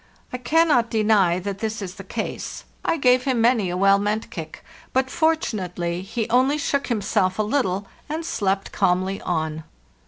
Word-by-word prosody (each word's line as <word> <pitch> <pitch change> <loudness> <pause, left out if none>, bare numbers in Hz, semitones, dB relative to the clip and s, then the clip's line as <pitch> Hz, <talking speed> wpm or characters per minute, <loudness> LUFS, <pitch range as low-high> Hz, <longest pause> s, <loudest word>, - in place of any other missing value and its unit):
I 250 - -3
cannot 255 -3 +3
deny 210 -6 +3
that 195 +1 -4
this 220 0 -3
is 190 -3 -5
the 195 0 -10
case; 215 +3 -5 0.2
I - - +1
gave 255 -2 +3
him 260 -3 +1
many 230 -5 +3
a 180 - -2
well 195 +1 +5
meant 210 +2 -2
kick, 160 -2 -8 0.3
but 260 0 +1
fortunately 190 - -1
he 220 +3 -3
only 260 +4 +3
shook 280 -1 -1
himself 195 -5 0
a 215 - +2
little 205 -5 0 0.2
and 315 +2 -3
slept 195 -9 -1
calmly 185 +2 +1
on. 160 -2 -2
215 Hz, 165 wpm, -23 LUFS, 185-255 Hz, 0.3 s, well